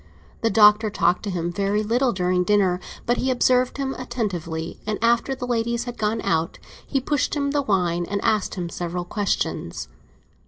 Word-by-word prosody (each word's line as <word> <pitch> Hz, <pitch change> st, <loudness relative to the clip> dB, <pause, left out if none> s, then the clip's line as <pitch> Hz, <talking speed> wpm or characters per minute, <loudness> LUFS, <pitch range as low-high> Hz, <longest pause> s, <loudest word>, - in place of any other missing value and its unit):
The 225 Hz, -, +2 dB
Doctor 210 Hz, +1 st, +6 dB
talked 180 Hz, -3 st, +1 dB
to -, -, -2 dB
him 175 Hz, -2 st, -2 dB
very 200 Hz, +3 st, 0 dB
little 240 Hz, +4 st, +2 dB
during 180 Hz, -2 st, +1 dB
dinner; 190 Hz, -2 st, +2 dB, 0.3 s
but 240 Hz, +1 st, +1 dB
he 265 Hz, -, 0 dB
observed 250 Hz, 0 st, +2 dB
him 270 Hz, -1 st, -2 dB
attentively, 180 Hz, -10 st, -4 dB
and 210 Hz, -1 st, -1 dB
after 235 Hz, +3 st, +2 dB
the 250 Hz, -, -5 dB
ladies 235 Hz, -1 st, 0 dB
had 245 Hz, -1 st, -7 dB
gone 215 Hz, +1 st, 0 dB
out 160 Hz, 0 st, 0 dB, 0.3 s
he 275 Hz, -, 0 dB
pushed 290 Hz, +3 st, 0 dB
him 280 Hz, -1 st, 0 dB
the 290 Hz, 0 st, +1 dB
wine 175 Hz, -7 st, 0 dB
and 200 Hz, -, -1 dB
asked 215 Hz, -3 st, +1 dB
him 180 Hz, -3 st, -3 dB
several 175 Hz, +1 st, -4 dB
questions. 205 Hz, +1 st, -2 dB
210 Hz, 180 wpm, -23 LUFS, 180-245 Hz, 0.3 s, Doctor